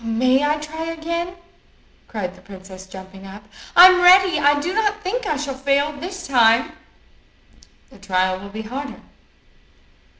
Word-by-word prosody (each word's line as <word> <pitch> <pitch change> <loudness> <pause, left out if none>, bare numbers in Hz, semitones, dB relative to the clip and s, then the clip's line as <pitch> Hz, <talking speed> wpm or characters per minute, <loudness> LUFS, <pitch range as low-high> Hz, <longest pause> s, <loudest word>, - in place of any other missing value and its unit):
"May 255 +4 +1
I 300 +1 +1
try 310 +2 -7
again?" 335 +2 -5 0.7
cried 190 -5 -5
the - - -19
princess, 190 -1 -13
jumping 190 +1 -12
up. 200 +2 -12 0.3
"I'm 365 +1 +8
ready. 365 -2 +5
I 290 0 +3
do 345 +6 -3
not 420 -1 -1
think 445 +4 -3
I 305 - -1
shall 285 -1 -4
fail 280 +2 -1
this 355 +5 -8
time." 235 +2 +3 1.2
"The 255 - -18
trial 185 -1 -1
will 200 +1 -10
be 215 +2 -8
harder." 270 +6 -7
285 Hz, 145 wpm, -20 LUFS, 205-340 Hz, 1.2 s, I'm